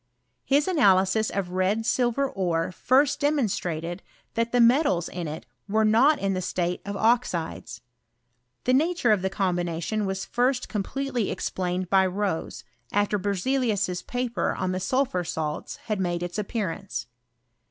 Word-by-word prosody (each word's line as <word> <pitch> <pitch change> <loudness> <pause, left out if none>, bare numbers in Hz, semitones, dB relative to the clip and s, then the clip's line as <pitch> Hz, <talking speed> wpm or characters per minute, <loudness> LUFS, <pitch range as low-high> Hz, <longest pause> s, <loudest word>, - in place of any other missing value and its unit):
His 285 +2 +2
analysis 205 - +3
of 190 -3 -3
red 190 +5 0
silver 245 +3 +1
ore 175 -7 -1
first 270 +8 +2
demonstrated 185 - -1 0.3
that 230 0 0
the 245 - +2
metals 235 - +4
in 175 -2 -5
it 150 -4 -6 0.2
were 220 +2 +3
not 250 +8 +5
in 195 0 -1
the 185 - -2
stale 180 0 -1
of 200 0 -3
oxides. 175 - 0 0.8
The 255 - +2
nature 310 -3 +2
of 210 -3 +3
the 190 - 0
combination 180 +1 -1
was 190 0 -3
first 250 +1 0
completely 245 +2 -2
explained 180 0 -2
by 190 -1 +5
Rose, 190 -2 -3 0.3
after 205 0 +1
Berzelius's 205 -2 0
paper 245 -1 -2
on 185 -1 -1
the 185 - -2
sulphur 215 -2 0
salts 160 -3 -4
had 215 -4 -2
mode 175 -2 -1
its 175 +4 -4
appearance. 200 -2 -3
200 Hz, 140 wpm, -26 LUFS, 180-245 Hz, 0.8 s, not